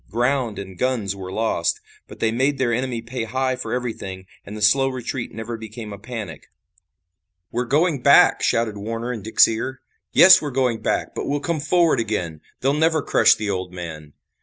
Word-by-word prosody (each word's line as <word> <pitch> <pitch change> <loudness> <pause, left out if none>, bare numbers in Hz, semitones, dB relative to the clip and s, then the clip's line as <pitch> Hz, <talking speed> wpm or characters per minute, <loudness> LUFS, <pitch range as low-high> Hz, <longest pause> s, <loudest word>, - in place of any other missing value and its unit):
Ground 120 0 0
and 95 -2 -8
guns 115 -7 -1
were 95 -1 -8
lost, 115 - 0 0.3
but - - -13
they 110 - +1
made 135 +4 +1
their 120 -3 0
enemy 125 -1 -2
pay 115 0 -4
high 130 +3 -1
for 130 - -6
everything, 105 -7 -4 0.2
and 105 +2 -9
the - - -8
slow 135 +6 +4
retreat 130 -1 -5
never 115 +1 -6
became 110 -1 -8
a 100 - -9
panic. 110 - -7 1.0
"We're 125 +1 -1
going 150 +2 +1
back," - - +6
shouted 115 -3 0
Warner 115 +4 -4
in 115 - -6
Dick's 110 +3 +5
ear. 120 +4 -4 0.3
"Yes, 185 0 +8
we're 150 - -3
going 125 -4 0
back, - - -1
but - - -4
we'll 145 +1 0
come 165 +2 -2
forward 160 -1 +2
again. 90 -9 -3 0.2
They'll 135 +2 +2
never 160 0 +2
crush - - +4
the 105 -1 -3
old 90 -2 -4
man." 80 -4 -8
115 Hz, 185 wpm, -22 LUFS, 105-130 Hz, 1.0 s, Yes